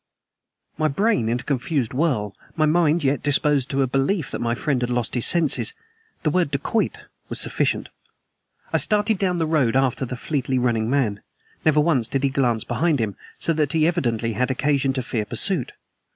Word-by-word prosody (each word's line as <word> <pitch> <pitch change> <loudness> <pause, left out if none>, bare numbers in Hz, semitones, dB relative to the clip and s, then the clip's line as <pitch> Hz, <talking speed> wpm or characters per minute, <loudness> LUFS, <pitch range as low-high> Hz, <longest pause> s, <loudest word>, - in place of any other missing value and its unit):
My 155 - +3
brain 155 - +1
in 120 +1 0
a - - -9
confused 135 -2 -1
whirl; 125 - 0 0.2
my 155 - +2
mind 160 0 +2
yet 140 +1 +1
disposed 145 -2 +2
to 135 0 +1
a - - 0
belief 135 +5 0
that - - -4
my 120 0 0
friend 140 -3 -1
had 120 - -1
lost 120 -1 -2
his 120 - +3
senses, 170 - +3 0.5
the 155 - +1
word 175 -1 +1
"dacoit" 140 +11 -1 0.3
was - - -2
sufficient. - - 0 0.8
I - - +4
started 210 -1 +2
down 185 -3 0
the 165 - 0
road 150 -7 +1
after 135 -1 +1
the 125 0 -4
fleetly 130 0 -2
running 115 -3 0
man. 120 -7 0 0.4
Never 155 -1 +3
once 145 -8 +1
did 135 +2 -2
he 140 - +3
glance 125 -5 0
behind 165 -3 0
him, 110 -3 -2 0.2
so 165 - +1
that 150 -3 0
he 160 -1 +3
evidently 120 -9 -1
had 125 +5 0
occasion 140 0 +1
to 130 -1 -2
fear 115 -2 -2
pursuit. - - +1
140 Hz, 190 wpm, -22 LUFS, 125-155 Hz, 0.8 s, I